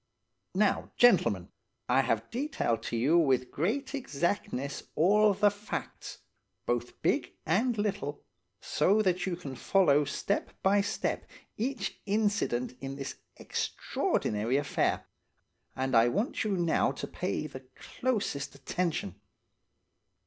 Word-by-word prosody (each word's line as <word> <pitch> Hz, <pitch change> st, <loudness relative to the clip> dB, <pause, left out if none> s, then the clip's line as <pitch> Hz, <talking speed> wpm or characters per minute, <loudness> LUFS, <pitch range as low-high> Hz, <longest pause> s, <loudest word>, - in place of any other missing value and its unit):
"Now, 205 Hz, +1 st, +2 dB
gentlemen, 180 Hz, -, +4 dB, 0.4 s
I 135 Hz, -, +4 dB
have 115 Hz, -3 st, -1 dB
detailed 245 Hz, -, -1 dB
to 120 Hz, -, -2 dB
you 145 Hz, +9 st, +4 dB
with 130 Hz, -5 st, +2 dB
great 255 Hz, -, -1 dB
exactness 170 Hz, -, -2 dB
all 210 Hz, +5 st, +5 dB
the 205 Hz, +1 st, +4 dB
facts, 205 Hz, +1 st, -6 dB, 0.4 s
both 120 Hz, 0 st, -2 dB
big -, -, +1 dB
and 220 Hz, +9 st, +2 dB
little, 190 Hz, -9 st, -2 dB, 0.4 s
so 200 Hz, -, +2 dB
that 185 Hz, -1 st, +1 dB
you 180 Hz, -, -1 dB
can 145 Hz, -6 st, -7 dB
follow 150 Hz, -1 st, +4 dB
step 195 Hz, +7 st, -2 dB
by 200 Hz, +1 st, +4 dB
step 200 Hz, -, -2 dB, 0.3 s
each 235 Hz, -2 st, -3 dB
incident 205 Hz, -, 0 dB
in 135 Hz, 0 st, -5 dB
this 135 Hz, -1 st, -5 dB, 0.2 s
extraordinary 110 Hz, +5 st, -1 dB
affair, 145 Hz, 0 st, 0 dB, 0.7 s
and 130 Hz, -1 st, 0 dB
I 115 Hz, +1 st, +6 dB
want 205 Hz, -, 0 dB
you 205 Hz, -3 st, 0 dB
now 170 Hz, -2 st, +2 dB
to -, -, -5 dB
pay 100 Hz, -, -3 dB
the 135 Hz, -3 st, -8 dB
closest 200 Hz, -, -2 dB
attention. 150 Hz, -, -2 dB
170 Hz, 120 wpm, -30 LUFS, 135-205 Hz, 0.7 s, I